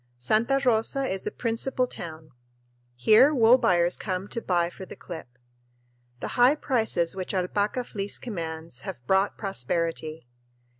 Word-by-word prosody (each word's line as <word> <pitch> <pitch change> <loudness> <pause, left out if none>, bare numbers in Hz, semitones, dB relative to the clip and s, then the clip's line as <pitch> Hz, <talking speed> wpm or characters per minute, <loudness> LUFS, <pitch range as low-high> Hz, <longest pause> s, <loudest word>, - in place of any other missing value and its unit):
Santa 220 - +2
Rosa 240 +3 +2
is 195 -7 -2
the - - -3
principal 250 +2 -1
town. 160 -8 -8 0.6
Here 220 - +5
wool 240 +1 +6
buyers 175 -3 +3
come 190 -1 -3
to 230 - -4
bid 175 -3 0
for - - -9
the - - -9
clip. 135 -8 -10 0.8
The - - -3
high 250 +4 +4
prices 220 - 0
which 190 +1 -4
alpaca 205 +6 0
fleece 205 -4 -4
commands 165 - -6
have 120 -2 -8
brought 190 +4 +2
prosperity. 165 - -2
195 Hz, 140 wpm, -26 LUFS, 165-230 Hz, 0.8 s, wool